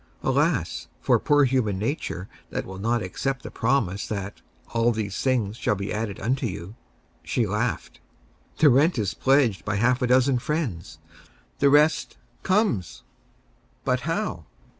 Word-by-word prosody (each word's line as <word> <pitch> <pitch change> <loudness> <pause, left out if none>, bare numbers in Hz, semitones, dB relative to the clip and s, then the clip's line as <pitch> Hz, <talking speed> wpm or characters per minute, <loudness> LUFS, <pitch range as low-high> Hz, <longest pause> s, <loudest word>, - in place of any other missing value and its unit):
Alas, - - 0
for - - +3
poor 145 0 +4
human 125 -7 +1
nature 105 - -3 0.2
that - - -3
will 95 0 -8
not 115 +3 0
accept 130 +8 -3
the - - -7
promise 115 -6 0
that 100 -2 -5 0.3
"all 115 +1 +3
these 105 -4 -3
things 120 -5 0
shall 105 - 0
be 100 +1 -4
added 105 -2 -3
unto 125 +4 0
you!" 90 0 -7 0.5
She 120 - 0
laughed. 105 +4 -2 0.6
"The 150 - +6
rent 145 +6 +4
is 105 -4 -1
pledged 130 -8 +2
by 100 0 -2
half 125 +4 +2
a 125 - +2
dozen 130 +1 +3
friends. 120 - -3 0.6
The 140 - +5
rest 150 +2 +3 0.2
comes." 185 - 0 0.8
"But - - +2
how?" - - -3
115 Hz, 145 wpm, -25 LUFS, 100-135 Hz, 0.8 s, The